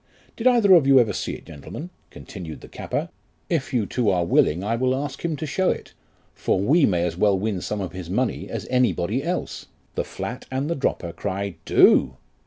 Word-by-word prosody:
Did 235 - 0
either 230 -6 +6
of 160 -6 +6
you 135 -1 +7
ever 110 -4 +2
see - - -3
it, - - -10
gentlemen? 150 - -9 0.2
continued 85 -6 -9
the - - -11
capper; - - -4 0.4
if 155 -6 0
you 120 -6 +1
two 120 +1 0
are 90 -3 +2
willing 85 +1 +2
I 110 +3 0
will 130 +2 +1
ask 140 0 -5
him 165 -2 -1
to 150 - -5
show 185 +6 +1
it, - - -4 0.4
for - - 0
we 140 - +4
may 85 -3 +1
as 85 - -2
well 100 0 +3
win 100 -2 -2
some 105 -1 -3
of 90 -4 -4
his 90 -2 -8
money 120 +6 -1
as 110 -5 -4
any 125 -6 +3
body 100 - -1
else: 180 +3 -3 0.3
the - - -1
flat 125 +3 -6
and 130 +2 -2
the - - +1
dropper 90 - -2
cry, 100 +1 -4
Do. 65 -1 +5
115 Hz, 210 wpm, -23 LUFS, 95-140 Hz, 0.4 s, you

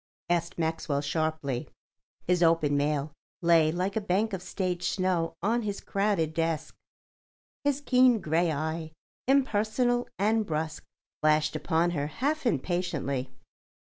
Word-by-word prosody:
asked 170 +1 0
Maxwell 160 -3 -1
sharply. 150 -3 -2 0.6
His 180 0 +2
opened 165 -4 +3
mail 145 +1 0 0.3
lay 165 -2 +5
like 185 +4 -2
a 220 - +1
bank 200 +3 0
of 190 - -3
stage 180 -1 -2
snow 180 -3 0
on 230 +4 +2
his 205 -2 -3
crowded 195 -6 0
desk. 165 -1 -1 0.9
His 285 -1 +1
keen 255 -4 +4
grey 165 0 +1
eye, 160 +1 -3 0.3
impersonal 245 -2 +2
and 220 +3 +2
brusque, 160 -3 -3 0.4
flashed 155 0 +3
upon 160 +3 +1
her 145 -4 -1
half 280 - -1
impatiently. 150 - -1
170 Hz, 125 wpm, -28 LUFS, 155-205 Hz, 0.9 s, lay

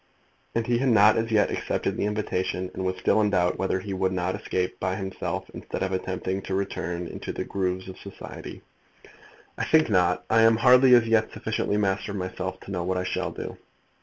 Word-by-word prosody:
And 115 -1 +1
he 120 0 +1
had 135 0 +2
not 105 -2 +6
as 115 0 0
yet 110 -2 +3
accepted - - -2
the - - -1
invitation, 95 -3 -2
and 95 - -4
was 95 0 -1
still 100 +3 +2
in 105 - +2
doubt 90 -3 +1
whether 95 0 0
he 100 +1 -5
would 95 0 0
not 90 0 -1
escape 90 -1 -2
by 95 0 -1
himself 95 -1 -4
instead - - -5
of 95 - -1
attempting 95 +1 -2
to 95 - -3
return 90 -3 -3
into - - -6
the - - -4
grooves 95 -1 -2
of 95 - -9
society. 100 - -9 1.0
"I - - 0
think 155 -7 +3
not; 90 -2 +2
I 115 0 +4
am 115 0 +6
hardly 125 +1 +7
as 120 -2 +5
yet 115 -1 +2
sufficiently 105 - -1
master 100 0 0
of - - -4
myself 95 0 -4
to - - -9
know 90 -2 -2
what 90 +1 -1
I 90 - -1
shall 95 - -2
do." - - -7
95 Hz, 210 wpm, -26 LUFS, 95-110 Hz, 1.0 s, hardly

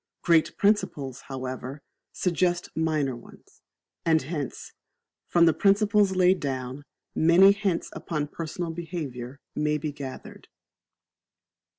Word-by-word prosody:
Great 165 -2 +3
principles, 145 - 0
however, 130 +1 -6 0.3
suggest 175 -1 0
minor 155 -5 0
ones; 120 - -16 0.4
and 160 -2 +3
hence, 145 -2 -5 0.5
from 170 -1 +4
the 165 - +5
principles 200 +2 +3
laid 185 0 +4
down, 130 0 -4 0.3
many 175 +5 +6
hints 200 -4 -1
upon 150 -3 -3
personal 165 +2 -5
behaviour 145 -7 -6 0.2
may 150 0 +1
be 150 0 -3
gathered. 140 -2 -9
160 Hz, 105 wpm, -26 LUFS, 140-180 Hz, 0.5 s, many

